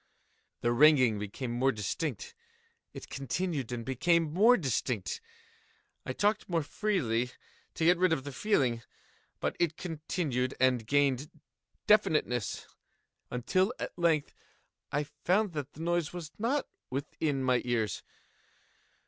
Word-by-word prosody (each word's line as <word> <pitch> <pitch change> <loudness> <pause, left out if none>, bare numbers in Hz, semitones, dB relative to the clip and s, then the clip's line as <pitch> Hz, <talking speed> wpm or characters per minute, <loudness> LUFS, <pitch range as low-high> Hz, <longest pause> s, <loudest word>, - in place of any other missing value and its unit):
The 120 - +2
ringing 130 -4 +5
became 105 +5 -4
more 130 +3 +2
distinct:—it 465 - -7
continued 140 -1 -2
and 120 -2 -4
became 160 +4 +2
more 225 +8 +6
distinct: 125 - -2 0.9
I - - -1
talked 205 +6 +1
more 165 -3 +1
freely 145 - 0 0.5
to 160 - 0
get 175 +1 +5
rid 185 -1 +4
of 145 -5 +1
the 145 - -6
feeling: 130 - +1 0.6
but - - -1
it 170 -2 +1
continued 155 -6 -2
and 125 -4 +2
gained 140 +1 +2 0.6
definiteness—until, 160 - 0
at - - -5
length, 165 -4 +1 0.6
I 145 +1 +1
found 180 +8 0
that 145 -2 -5
the 155 - -10
noise 170 -1 0
was 170 -3 -6
not 255 +6 0 0.2
within 140 +1 -2
my 130 -1 +3
ears. 115 -5 -1
150 Hz, 120 wpm, -30 LUFS, 125-180 Hz, 0.9 s, more